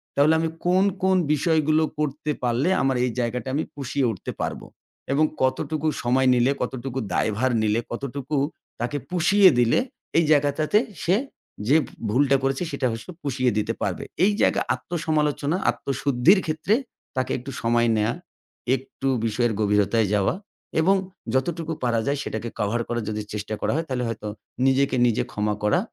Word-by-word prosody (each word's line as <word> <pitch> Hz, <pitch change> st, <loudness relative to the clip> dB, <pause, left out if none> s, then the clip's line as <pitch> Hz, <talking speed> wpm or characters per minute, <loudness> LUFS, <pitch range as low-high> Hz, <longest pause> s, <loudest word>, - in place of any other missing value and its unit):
তাহলে 145 Hz, +3 st, +5 dB
আমি 165 Hz, -, 0 dB, 0.2 s
কোন, 180 Hz, +2 st, +4 dB, 0.2 s
কোন 190 Hz, 0 st, +4 dB, 0.2 s
বিষয়গুলো 155 Hz, 0 st, +2 dB, 0.2 s
করতে 150 Hz, 0 st, -1 dB
পারলে 125 Hz, +7 st, +1 dB
আমার 135 Hz, -1 st, +2 dB
এই 125 Hz, -, -1 dB
জায়গাটা 125 Hz, +2 st, -2 dB
আমি 155 Hz, -, +1 dB
পুষিয়ে 140 Hz, -1 st, -1 dB
উঠতে 95 Hz, -, -6 dB
পারবো? -, -, -3 dB, 0.5 s
এবং 155 Hz, +3 st, +4 dB, 0.2 s
কতটুকু 150 Hz, +4 st, 0 dB, 0.2 s
সময় 130 Hz, +2 st, +3 dB
নিলে, 125 Hz, +2 st, +3 dB
কতটুকু 130 Hz, +1 st, -3 dB
দায়ভার 115 Hz, +5 st, +1 dB
নিলে 110 Hz, +1 st, +2 dB
কতটুকু 140 Hz, +3 st, -3 dB, 0.4 s
তাকে 120 Hz, +5 st, -1 dB
পুষিয়ে 185 Hz, +3 st, +5 dB
দিলে 120 Hz, -1 st, +4 dB, 0.4 s
এই 165 Hz, -, +5 dB
জায়গাটাতে 150 Hz, +5 st, +3 dB, 0.3 s
সে 180 Hz, -, +3 dB, 0.5 s
যে, 140 Hz, -, +5 dB
ভ -, -, -15 dB, 0.2 s
ভুলটা 135 Hz, +4 st, +3 dB
করেছে 135 Hz, +4 st, 0 dB
সেটা 140 Hz, -2 st, 0 dB
হস 115 Hz, 0 st, -6 dB, 0.2 s
পুষিয়ে 130 Hz, -3 st, +1 dB
দিতে 105 Hz, -, 0 dB
পারবে। -, -, -2 dB, 0.2 s
এই 205 Hz, -, +5 dB
জায়গা -, -, +3 dB
আত্মসমালোচনা, 155 Hz, +1 st, -1 dB
আত্মশুদ্ধির 135 Hz, -, +2 dB
ক্ষেত্রে 160 Hz, +6 st, 0 dB, 0.4 s
তাকে 130 Hz, -1 st, -1 dB
একটু 130 Hz, +2 st, -7 dB
সময় 120 Hz, 0 st, +2 dB
নেয়া। 110 Hz, +2 st, +1 dB, 0.6 s
একটু 135 Hz, +1 st, -6 dB, 0.2 s
বিষয়ের 115 Hz, +1 st, +1 dB
গভীরতায় 105 Hz, +1 st, +2 dB
যাওয়া 100 Hz, -2 st, +2 dB, 0.5 s
এবং 195 Hz, +4 st, +4 dB, 0.4 s
যতটুকু 165 Hz, +4 st, -1 dB
পারা 120 Hz, -2 st, +2 dB
যায় 140 Hz, +1 st, +1 dB
সেটাকে 110 Hz, +2 st, -4 dB
কভার 110 Hz, +3 st, 0 dB
করার 120 Hz, -1 st, -2 dB
যদি 105 Hz, 0 st, -3 dB
চেষ্টা 105 Hz, 0 st, -4 dB
করা -, -, 0 dB
হয় 165 Hz, +1 st, -1 dB
তাহলে 125 Hz, -2 st, -1 dB
হয়তো 105 Hz, -2 st, -5 dB, 0.4 s
নিজেকে 135 Hz, 0 st, +2 dB
নিজে 120 Hz, -3 st, +2 dB
ক্ষমা 105 Hz, 0 st, 0 dB
করা 105 Hz, +8 st, +3 dB
135 Hz, 155 wpm, -24 LUFS, 120-155 Hz, 0.6 s, তাহলে